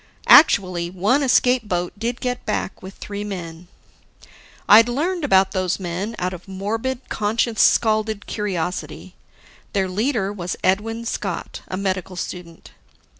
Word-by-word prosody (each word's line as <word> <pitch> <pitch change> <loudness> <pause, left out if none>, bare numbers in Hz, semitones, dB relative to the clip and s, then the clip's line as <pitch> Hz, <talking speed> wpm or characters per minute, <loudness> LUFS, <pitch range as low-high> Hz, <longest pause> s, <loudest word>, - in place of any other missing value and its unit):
Actually, 185 - +6
one 200 +10 +1
escape 250 -3 +3
boat 175 -1 -1
did 230 +4 -3
get 250 -1 -3
back - - -3
with 190 +1 -10
three 205 0 -6
men. 175 -4 -7 1.0
I'd 225 +3 +8
learned 335 +7 -1
about 190 -8 +4
those 185 -1 -1
men, 190 +5 -4
out 180 +1 -2
of 180 +1 -10
morbid, 225 +7 -4
conscience 220 +2 0
scalded 215 -1 +2
curiosity. 185 -4 -4 0.6
Their 195 -2 +1
leader 205 +1 -1
was 180 -3 -4
Edwin 225 +4 0
Scott, - - -4
a 185 - -4
medical 190 -1 -3
student. 175 -2 -8
200 Hz, 130 wpm, -21 LUFS, 185-230 Hz, 1.0 s, I'd